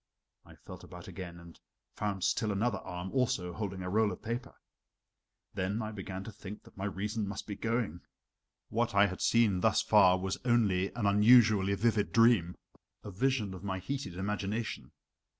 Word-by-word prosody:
I - - -16
felt - - -12
about - - -11
again, 85 -3 -8
and 85 -1 -14 0.3
found 100 -3 -3
still 110 - +1
another 105 +1 0
arm, 90 +1 -6
also 105 -9 0
holding 95 -2 -4
a 90 - -4
roll 110 0 +2
of 90 - -9
paper. 120 +3 -4 1.0
Then 95 +4 -2
I 110 - -4
began 95 -2 -6
to 110 - -8
think 105 0 -10
that - - -18
my 95 - -4
reason 105 +2 -3
must 100 +1 -5
be 105 - -5
going. 115 -6 -2 0.7
What 115 -1 -1
I 100 0 +6
had 95 -2 -4
seen 110 -5 +3
thus - - +2
far 90 0 +5
was 95 0 -3
only 105 -6 +2
an 120 -4 -2
unusually 105 -1 +5
vivid 110 0 +1
dream 115 -7 +4 0.5
a 105 - -7
vision 110 -1 0
of 95 0 -9
my 95 -2 -2
heated 95 -2 -5
imagination. 105 +3 -3
100 Hz, 170 wpm, -31 LUFS, 95-115 Hz, 1.0 s, I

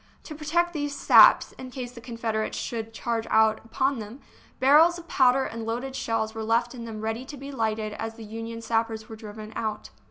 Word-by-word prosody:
To 310 - -8
protect 335 +4 0
these 290 -2 -3
" - - -7
saps," - - +7
in 260 - -7
case 250 -2 -6
the 240 -1 -12
Confederates 230 -2 -3
should 225 -1 -4
charge 230 0 -3
out 220 0 +4
upon 260 +3 0
them, 220 +5 -8 0.4
barrels 310 +6 +6
of 340 -1 -11
powder 260 0 +4
and 230 -2 -5
loaded 245 +4 -3
shells 220 -3 -1
were 225 -1 -5
left 235 +2 +1
in 235 -2 -7
them 220 -2 -7
ready 225 +3 -3
to 285 +2 -9
be 275 +1 -8
lighted 220 -4 -2
as 225 +1 -5
the 225 -1 -10
Union 225 +1 -7
sappers 225 -1 -1
were 220 - -7
driven 215 0 -9
out. 215 -2 -4
230 Hz, 210 wpm, -26 LUFS, 220-260 Hz, 0.4 s, saps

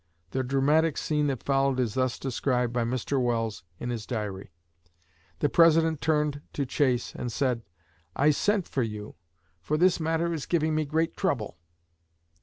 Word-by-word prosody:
The 130 - 0
dramatic 145 +4 +2
scene 150 -1 0
that 135 -5 -2
followed 135 -1 +1
is 120 -5 0
thus 130 0 0
described 125 -2 -1
by 120 -1 +1
Mr. 130 +3 -1
Welles 115 -3 -1 0.2
in 120 - -3
his 115 -3 -5
Diary: 105 -6 -4 0.9
"The 145 - +4
President 165 -1 +4
turned 150 -2 +1
to 140 - -1
Chase 125 -2 0
and 120 - -4
said, 125 -2 0 0.5
'I 145 +2 +4
sent 205 +5 +1
for 135 - -1
you, 105 -2 -4 0.5
for 150 - -1
this 180 +2 +4
matter 165 +1 0
is 155 -4 -4
giving 160 -2 +1
me 155 0 +1
great 160 +3 0
trouble.' 120 - -2
135 Hz, 160 wpm, -27 LUFS, 120-155 Hz, 0.9 s, The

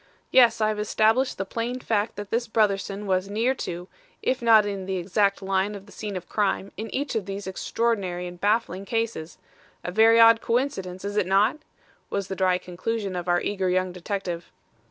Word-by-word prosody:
Yes, 235 -3 +5
I 215 - +3
have 215 -1 -2
established 220 +5 +2
the 195 - -2
plain 235 +5 -3
fact 220 -3 -1
that 205 -1 -7
this 235 +1 0
Brotherson 205 -2 0
was 190 0 0
near 230 +5 +1
to, 180 -7 -6 0.4
if 255 - 0
not 225 -3 +6
in 195 -2 -4
the 190 - -1
exact 195 +3 +1
line 195 +2 0
of 195 -1 -10
the 205 - -17
scene 205 -3 -5
of 180 - -8
crime 200 -1 -1
in 220 +1 -6
each 280 0 -2
of 215 -4 -2
these 195 +1 -5
extraordinary 190 -2 -1
and 175 0 -9
baffling 205 -3 +1
cases. 225 -8 -3 0.5
A 180 - -4
very 225 +4 +5
odd 230 0 +7
coincidence, 200 -7 -2
is 205 +1 -3
it 200 -4 +2
not?" 205 +9 +3 0.5
was 200 -2 -3
the 190 - -3
dry 185 -1 +2
conclusion 190 +3 -4
of 175 0 -4
our 175 0 +2
eager 190 -2 -1
young 185 0 +1
detective. 180 -1 -5
200 Hz, 195 wpm, -25 LUFS, 185-225 Hz, 0.5 s, odd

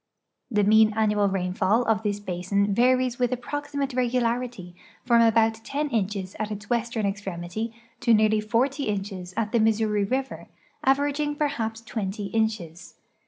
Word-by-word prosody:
The 210 -4 +2
mean 215 +1 +5
annual 210 -2 +2
rainfall 190 +4 +1
of 220 -2 +1
this 205 -2 -2
basin 200 +1 -1
varies 255 +2 +2
with 245 0 +1
approximate 280 +2 -3
regularity 240 -6 -1 0.3
from 235 -1 +5
almutten 225 +6 +1
inches 195 -3 -2
at 215 -1 -2
its 210 +1 -7
western 235 -2 0
extremity 195 +2 -4 0.3
to 235 - +1
nearly 215 -1 +4
forty 260 +6 0
inches 195 -3 -4
at 220 -2 -1
the 235 - +2
Missouri 215 -1 +2
river, 260 +6 -3 0.4
averaging 290 +2 +1
perhaps 230 -7 -2
twenty 205 -3 -4
inches. 190 -7 -2
220 Hz, 135 wpm, -25 LUFS, 205-245 Hz, 0.4 s, mean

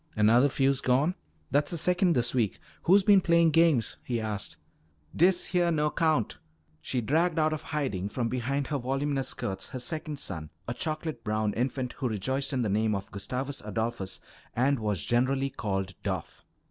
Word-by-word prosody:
"Another 115 +6 +5
fuse 135 0 +2
gone? 135 +7 +2 0.4
That's 145 +2 +2
the 170 - -1
second 180 +2 +3
this 120 0 +2
week. 115 -6 +1 0.3
Who's 195 +3 +6
been 200 -1 +6
playing 170 -1 +4
games?" 160 -8 +3
he 120 -2 -2
asked. 105 -2 -3 0.6
"Dis 180 +1 +4
heah 175 -2 +2
no 150 -2 +1
'count!" 150 - +1 0.4
She 125 +9 -2
dragged 160 +8 +1
out 155 0 +3
of 155 - -4
hiding 135 - -2
from 120 +2 -1
behind 130 +4 -1
her 145 - +1
voluminous 135 +2 -1
skirts 95 0 -4
her 130 - -6
second 155 +3 -4
son, 80 - -5 0.2
a 120 - -1
chocolate 155 -3 -4
brown 110 -1 0
infant 125 +2 -2
who 130 -3 0
rejoiced 130 +6 -2
in 130 -3 0
the - - 0
name 105 +1 +1
of 100 +2 -6
Gustavus 130 +8 -4
Adolphus 110 -2 -3 0.4
and 135 +2 +2
was 105 -7 -1
generally 130 +3 +1
called 95 -4 -3
"Doff." - - -4
130 Hz, 170 wpm, -28 LUFS, 110-155 Hz, 0.6 s, Who's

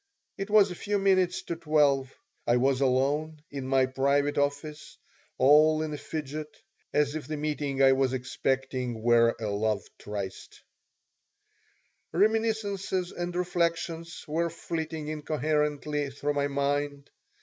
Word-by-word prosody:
It 195 +1 -5
was 205 -2 +5
a - - -5
few 205 +3 -1
minutes 185 -2 +2
to 170 - -4
12. 145 -5 +2 0.4
I 120 - +4
was 135 +1 +2
alone 145 +4 +1
in 135 -2 -5
my 135 0 +3
private 140 +2 +1
office, 145 +2 -3 0.4
all 155 +3 +5
in 155 -1 -4
a - - -4
fidget, 150 0 -6 0.3
as 145 -1 +2
if 155 -1 -5
the 155 0 -3
meeting 145 -2 -1
I 135 - +7
was 135 -1 +2
expecting 130 -2 -2
were 115 0 +4
a 110 - -4
love 105 0 0 0.2
tryst. 100 -2 -6 1.5
Reminiscences 205 -3 0
and 175 0 -4
reflections 170 -2 -2
were 165 +3 0
flitting 160 -2 -4
incoherently 150 -1 -1
through 145 +2 -2
my 140 0 +1
mind. 140 0 -2
150 Hz, 130 wpm, -28 LUFS, 135-165 Hz, 1.5 s, I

